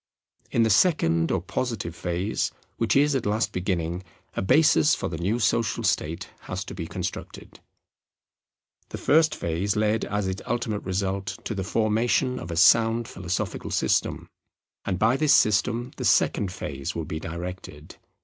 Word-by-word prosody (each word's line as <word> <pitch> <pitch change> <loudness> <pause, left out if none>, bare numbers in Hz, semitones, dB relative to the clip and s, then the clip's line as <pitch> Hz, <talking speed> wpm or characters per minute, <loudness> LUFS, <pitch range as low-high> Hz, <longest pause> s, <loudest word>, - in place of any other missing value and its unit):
In 115 - +2
the 110 - +2
second 85 - +3
or 95 - +1
positive 95 -2 -3
phase, 90 +5 -2 0.3
which - - +1
is 145 +1 +4
at 130 -6 -1
last 110 +2 0
beginning, 90 -2 -2 0.3
a - - -1
basis 95 - +4
for - - -3
the 80 -1 -5
new 100 +7 0
social 115 -1 0
state 80 +2 -1
has - - -5
to - - -8
be - - -5
constructed. - - -6 1.3
The - - -6
first 155 +1 +3
phase 85 +5 -1
led 110 +1 +1
as 105 -1 -2
its 95 +1 -3
ultimate 110 -3 -2
result 95 +1 -2
to - - -3
the 95 -2 -3
formation 115 +5 +1
of 80 - -8
a 85 - -4
sound 115 +5 +5
philosophical 90 -1 -4
system; - - 0 0.6
and 95 - -1
by 115 +7 +3
this 150 -1 +4
system 115 +4 +2
the - - -3
second 100 -3 +2
phase 70 -6 -5
will 80 - -3
be 80 +1 -4
directed. 85 -2 -7
100 Hz, 160 wpm, -25 LUFS, 85-115 Hz, 1.3 s, sound